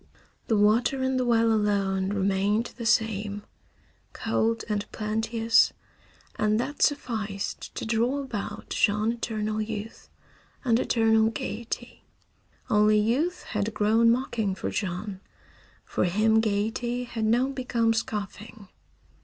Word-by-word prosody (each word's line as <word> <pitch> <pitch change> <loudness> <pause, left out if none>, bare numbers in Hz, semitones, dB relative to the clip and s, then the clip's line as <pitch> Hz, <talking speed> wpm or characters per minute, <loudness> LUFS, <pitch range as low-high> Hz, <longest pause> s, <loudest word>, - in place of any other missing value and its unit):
The 220 - +2
water 230 +6 +3
in 260 0 +1
the 255 - +1
well 230 -1 +3
alone 200 -3 +1
remained 200 +3 0
the 235 -2 -4
same, 210 -2 0 0.7
cold 225 0 0
and 210 -2 -3
plenteous, 225 +1 +2 0.7
and 215 +1 +2
that 270 +4 -4
sufficed 220 -8 -1
to - - -4
draw 235 +5 0
about 230 -7 -6
Jean 210 +1 +2
eternal 215 -2 -2
youth 215 0 -6 0.6
and 235 -1 +3
eternal 220 -2 +3
gaiety. 230 +2 -6 0.6
Only 210 0 +4
youth 255 +12 0
had 210 0 -3
grown 225 +2 +4
mocking 230 -5 0
for - - -4
Jean. 190 0 -3 0.7
For - - 0
him 215 +5 +3
gaiety 225 +3 -1
had 230 -2 -3
now 240 +4 +2
become 245 -4 0
scoffing. 210 -2 -5
220 Hz, 120 wpm, -26 LUFS, 210-235 Hz, 0.7 s, Only